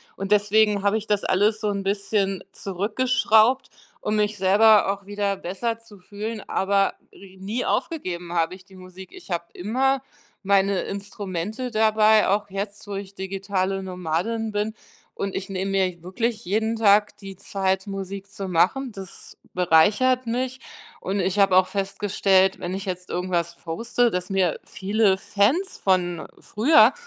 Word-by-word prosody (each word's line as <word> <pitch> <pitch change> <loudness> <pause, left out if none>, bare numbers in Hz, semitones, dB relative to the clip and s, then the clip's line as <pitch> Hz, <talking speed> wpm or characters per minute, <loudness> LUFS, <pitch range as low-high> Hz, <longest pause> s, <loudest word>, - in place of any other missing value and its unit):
Und 195 +1 -5
deswegen 210 0 +3
habe 205 +2 +2
ich 215 - -6
das 205 -1 0
alles 205 +3 +2
so 215 - -2
'n 200 -1 -2
bisschen 195 -1 -1
zurückgeschraubt, 220 +4 +2 0.3
um 210 - -2
mich 210 0 0
selber 200 +2 +5
auch 200 -1 -12
wieder 205 -1 -1
besser 225 +6 -3
zu 210 -4 -16
fühlen, 210 +3 -6
aber 195 0 +1 0.2
ri 190 -1 -15
nie 210 +6 -3
aufgegeben 180 - -2
habe 170 +1 0
ich 185 - -16
die 190 -1 -18
Musik. 185 0 -12
Ich 370 - -14
habe 170 -1 -1
immer 260 +7 0 0.4
meine 195 0 +2
Instrumente 200 +3 -5
dabei, 215 -1 +4
auch 205 0 0
jetzt, 200 +1 -6
wo 200 - -5
ich 195 0 -7
digitale 195 0 -2
Nomadin 185 +5 -2
bin. 210 +1 -1 0.4
Und 195 -1 -4
ich 195 0 -4
nehme 195 +1 -2
mir 185 -3 0
wirklich 225 +5 -2
jeden 220 +4 0
Tag 210 -1 +4
die 195 -1 -9
Zeit, 190 0 -1
Musik 195 0 -6
zu 195 -1 -6
machen, 210 +10 +1
das 195 -3 -11 0.2
bereichert 205 +10 +3
mich. 255 +2 -2 0.4
Und 195 +2 -2
ich 190 +1 0
habe 195 -2 +4
auch 185 0 +5
festgestellt, 195 -1 +1
wenn 175 +1 -4
ich 195 +1 -4
jetzt 180 -1 -5
irgendwas 175 -2 -1
poste, 235 +8 0
dass 180 -2 -3
mir 185 -4 +1
viele 200 0 +1
Fans 270 - +1
von 175 -4 +1
früher 275 +10 +4
200 Hz, 155 wpm, -24 LUFS, 190-215 Hz, 0.4 s, selber